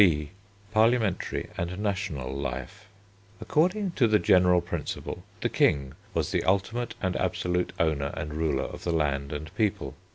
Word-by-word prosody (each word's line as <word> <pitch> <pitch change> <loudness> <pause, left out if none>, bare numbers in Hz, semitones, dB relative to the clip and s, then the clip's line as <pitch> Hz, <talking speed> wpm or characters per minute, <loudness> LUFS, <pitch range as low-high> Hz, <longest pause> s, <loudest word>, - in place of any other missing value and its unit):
B. 75 -6 +4 0.4
PARLIAMENTARY 110 -3 +2
AND 85 +1 -2
NATIONAL 95 -11 -2
LIFE 70 - -5 0.5
According 185 +5 +1
to 125 -8 +3
the 110 -1 +5
general 90 -3 +5
principle, - - -4 0.2
the - - +2
King 70 -2 +2 0.2
was - - 0
the - - +1
ultimate 110 +4 0
and 95 -1 0
absolute 90 0 0
owner 75 -4 +1
and 75 0 -4
ruler 75 -4 0
of - - -7
the 85 - 0
land 70 -3 0
and 80 +3 -5
people. 100 - 0
90 Hz, 150 wpm, -28 LUFS, 75-105 Hz, 0.5 s, the